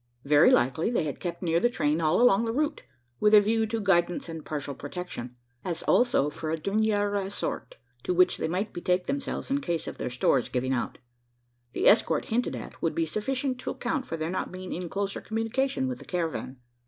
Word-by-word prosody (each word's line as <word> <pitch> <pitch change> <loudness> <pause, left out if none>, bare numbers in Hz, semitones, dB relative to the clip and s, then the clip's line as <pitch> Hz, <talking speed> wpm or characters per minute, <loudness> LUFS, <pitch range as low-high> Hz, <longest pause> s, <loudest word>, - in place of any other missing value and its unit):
Very 145 +1 +6
likely, 130 - +2
they 235 -8 +1
had 150 -2 -4
kept 175 0 -5
near 165 -1 +2
the 240 - +3
train 155 -8 0
all 155 +1 +3
along 235 -3 +5
the 225 - -1
route 295 +5 -1 0.4
with 210 0 +5
a - - +10
view 220 +2 +1
to 225 +1 -2
guidance 175 -4 +1
and 165 -2 -7
partial 145 -2 -4
protection 145 -4 -7 0.3
as 175 -3 -3
also 195 - +3
for 155 +1 -5
a 160 - 0
dernier 205 +4 +1
ressort 200 - -3 0.3
to - - -2
which 365 0 +4
they - - -1
might 185 +6 -2
betake 180 +1 0
themselves 275 -1 -3
in 280 +1 +1
case 170 - -2
of - - -7
their - - -2
stores 125 +1 +1
giving 130 +1 -1
out. 120 - -2 0.8
The - - +1
escort, 215 - +4
hinted 240 +2 0
at, - - -9
would - - 0
be 335 -1 +1
sufficient 260 +2 -2
to - - -4
account 280 -5 -2
for 165 - -4
their 160 +1 -2
not 185 - -3
being 185 0 -6
in 175 -1 -4
closer 200 +1 -3
communication 260 +4 -1
with 255 -1 -4
the - - -12
caravan. 165 -7 -3
190 Hz, 205 wpm, -27 LUFS, 160-230 Hz, 0.8 s, a